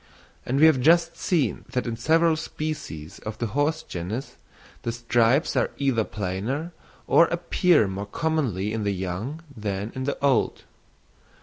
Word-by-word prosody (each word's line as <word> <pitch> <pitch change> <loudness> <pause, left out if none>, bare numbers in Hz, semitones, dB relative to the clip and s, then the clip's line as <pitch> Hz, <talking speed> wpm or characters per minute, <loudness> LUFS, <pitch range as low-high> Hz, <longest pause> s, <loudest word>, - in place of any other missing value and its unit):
And 135 +3 +1
we 155 - +7
have 155 -5 +5
just 165 +3 +4
seen 150 - 0
that 125 - 0
in 115 -2 -2
several 160 +7 +3
species 155 - -5
of 110 0 -6
the 120 - -2
horse 155 +3 +1
genus 95 +10 -5 0.5
the 115 - -2
stripes 120 +4 +2
are - - +2
either 135 -5 +1
plainer 105 - -3 0.3
or 170 - +6
appear 170 - +3
more 95 +1 -5
commonly 115 - -1
in 110 -1 -2
the 100 -1 0
young 95 - -4
than 105 -1 -3
in 130 0 -4
the 140 - -1
old. 135 -4 +1
125 Hz, 150 wpm, -25 LUFS, 105-155 Hz, 0.5 s, we